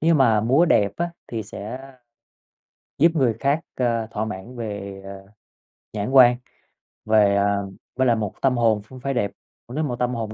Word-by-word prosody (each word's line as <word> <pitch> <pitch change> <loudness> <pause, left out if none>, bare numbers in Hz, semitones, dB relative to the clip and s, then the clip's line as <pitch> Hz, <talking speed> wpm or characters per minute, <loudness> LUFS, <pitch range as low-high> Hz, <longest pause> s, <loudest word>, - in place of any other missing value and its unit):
nhưng 165 0 +3
mà 115 -5 +4
múa 130 +9 +4
đẹp 105 - +3
á 170 0 -2 0.2
thì 115 -2 -4
sẽ 105 +3 -7 1.2
giúp 165 +4 +5
người 130 -6 +2
khác, 140 +2 +1 0.2
ờ, 115 -3 0
thỏa 110 0 -2
mãn 110 +4 -7
về, 100 -4 -6
ờ, 95 0 -10 0.7
nhãn 105 +1 -3
quan, 125 -2 +7 0.7
về, 105 -2 +4
à 100 0 +2 0.4
với 130 0 +2
lại 120 - +4
một 105 -3 -3
tâm 130 -2 +2
hồn 110 -3 +2
cũng 130 +5 -13
phải 135 +2 -2
đẹp, 110 -6 -1 0.4
nếu 140 +6 -3
một 130 -5 -2
tâm 125 0 0
hồn 110 -2 -4
115 Hz, 180 wpm, -23 LUFS, 105-130 Hz, 1.2 s, quan